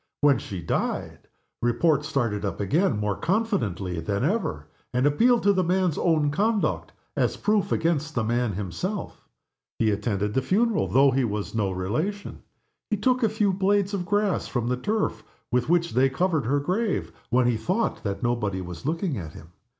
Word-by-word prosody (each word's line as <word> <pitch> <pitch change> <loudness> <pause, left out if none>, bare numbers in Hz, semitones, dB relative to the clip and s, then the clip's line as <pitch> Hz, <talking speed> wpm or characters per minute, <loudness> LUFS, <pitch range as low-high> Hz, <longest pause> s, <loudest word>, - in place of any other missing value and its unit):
When 145 -4 +5
she 90 -4 -6
died 80 - -3 0.3
Report 145 +5 +2
started 120 -9 -1
up 100 - -3
again 140 - +1
more 105 -1 -1
confidently 130 - -1
than 100 +7 -2
ever, 140 - -1 0.3
and 125 +2 +1
appealed 230 +12 +4
to 200 0 +5
the 185 -1 +2
man's 180 -2 +1
own 155 -4 +2
conduct 210 +6 0 0.2
as - - 0
proof 210 -2 +1
against 155 -2 0
the 120 - +1
man 120 0 0
himself. 105 - -5 0.5
He 110 -1 +2
attended 105 0 -1
the 130 - +2
funeral 220 - +1
though 135 +1 +5
he 130 +1 +1
was 105 -3 -3
no 105 -3 0
relation. 120 - -3 0.5
He 210 - +1
took 255 +5 +2
a 225 - +3
few 210 -2 +1
blades 200 +1 +1
of 180 -3 -2
grass 205 0 +1
from 120 -2 -2
the 125 - +1
turf 210 +11 -1 0.3
with 125 +3 +1
which 170 -1 +2
they 130 +2 +4
covered 155 -2 0
her 145 +3 +2
grave 190 +8 -1 0.2
when 125 +1 +3
he 120 -1 +2
thought 185 - -1
that 100 +3 -3
nobody 105 -6 0
was 90 +6 -7
looking 165 -2 -1
at 80 -3 -8
him. 80 +1 -12
145 Hz, 175 wpm, -25 LUFS, -, 0.5 s, When